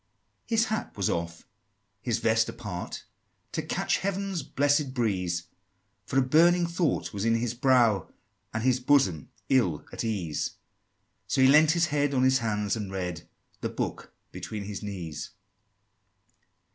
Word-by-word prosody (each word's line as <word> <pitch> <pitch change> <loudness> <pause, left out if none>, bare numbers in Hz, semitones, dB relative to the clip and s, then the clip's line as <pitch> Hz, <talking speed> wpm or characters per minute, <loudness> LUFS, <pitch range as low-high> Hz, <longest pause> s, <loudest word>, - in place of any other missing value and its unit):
IV. - - -39
His 225 -1 +3
hat 220 - -3
was 100 - +1
off, 85 0 -4 0.5
his - - 0
vest 110 0 +2
apart, 105 -7 -6 0.5
To - - -2
catch - - 0
heaven's 195 -2 -2
blessed 145 0 +1
breeze; 90 -8 0 0.6
For 130 - -1
a 135 - +5
burning 170 +6 +4
thought 170 -6 -1
was 100 0 -3
in 115 0 +3
his 115 0 -1
brow, 120 - +3 0.4
And 110 0 -3
his 130 0 +3
bosom 125 - +2 0.2
ill 95 - +2
at - - -3
ease: 95 -9 -2 0.7
So - - 0
he 130 - +7
lean'd 150 +3 +6
his 170 - +4
head 145 -1 +1
on 130 - +3
his 130 0 +4
hands, 105 -3 -1
and 105 -4 -5
read 90 -3 -4 0.3
The - - -2
book - - -4 0.2
between 105 -2 -6
his 100 0 -6
knees! 85 -7 -6
115 Hz, 150 wpm, -28 LUFS, 100-145 Hz, 0.7 s, he